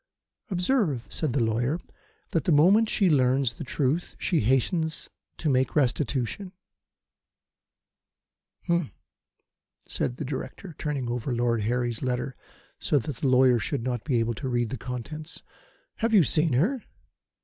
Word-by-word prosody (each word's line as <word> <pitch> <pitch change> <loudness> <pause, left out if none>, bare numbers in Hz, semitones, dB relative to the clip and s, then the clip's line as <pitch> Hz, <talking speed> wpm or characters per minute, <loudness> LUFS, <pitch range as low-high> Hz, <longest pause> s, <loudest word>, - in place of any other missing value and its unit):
"Observe," 180 - +1
said 155 -5 -1
the 130 - 0
lawyer, 120 +8 0 0.5
"that 165 - 0
the 180 - +2
moment 195 +9 +5
she 195 - +2
learns 130 -4 +3
the - - -7
truth 145 +5 -1
she 170 - +1
hastens 150 - 0 0.3
to 160 - -3
make 130 -2 +2
restitution." 145 - 0 2.1
"Humph!" 170 -5 +1 1.0
said 125 - -2
the 150 - -4
Director, 150 +6 -6
turning 140 -5 -2
over 120 +2 -2
Lord 120 -1 +1
Harry's 120 +1 -1
letter 125 0 -2 0.4
so 145 - +1
that 135 0 -3
the 140 - -1
lawyer 130 -1 +5
should 135 +1 -2
not 125 -2 -2
be 125 - +1
able 115 +1 0
to 130 +4 -4
read 120 -2 0
the 130 - -3
contents. 125 +5 -6 0.5
"Have 225 -1 +1
you 190 - +7
seen 155 +4 +2
her?" 210 - +2
135 Hz, 140 wpm, -27 LUFS, 120-160 Hz, 2.1 s, you